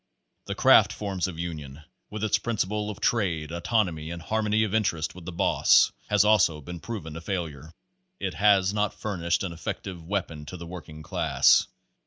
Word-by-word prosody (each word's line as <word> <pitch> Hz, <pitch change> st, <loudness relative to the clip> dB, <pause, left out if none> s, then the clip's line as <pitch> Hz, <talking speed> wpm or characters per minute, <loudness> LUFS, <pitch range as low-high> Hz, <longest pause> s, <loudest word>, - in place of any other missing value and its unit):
The -, -, -4 dB
craft -, -, +6 dB
form 100 Hz, -3 st, -5 dB
of 90 Hz, -3 st, -7 dB
union, 75 Hz, -4 st, -6 dB, 0.3 s
with 105 Hz, 0 st, -5 dB
its 110 Hz, -, +2 dB
principle 105 Hz, -2 st, -2 dB
of 105 Hz, -, -7 dB
trade 85 Hz, -9 st, 0 dB
autonomy, 85 Hz, -3 st, -1 dB
and 85 Hz, 0 st, -5 dB
harmony 110 Hz, +4 st, 0 dB
of 105 Hz, -2 st, -2 dB
interest 95 Hz, -8 st, 0 dB
with 90 Hz, -2 st, -12 dB
the 90 Hz, -, -5 dB
boss, 85 Hz, -, +4 dB, 0.2 s
has 105 Hz, 0 st, +4 dB
also 90 Hz, -7 st, +4 dB
been 85 Hz, +4 st, -8 dB
proven 80 Hz, -7 st, -6 dB
a 80 Hz, -, -6 dB
failure. 80 Hz, -5 st, -5 dB, 0.5 s
It -, -, -3 dB
has 100 Hz, -2 st, +3 dB
not 105 Hz, 0 st, 0 dB
furnished 85 Hz, -5 st, -1 dB
an 95 Hz, -, -3 dB
effective 85 Hz, +2 st, -6 dB
weapon 80 Hz, -5 st, -4 dB
to 90 Hz, -, -7 dB
the 85 Hz, -, -8 dB
working 80 Hz, -3 st, -9 dB
class. -, -, +3 dB
90 Hz, 175 wpm, -26 LUFS, 80-105 Hz, 0.5 s, craft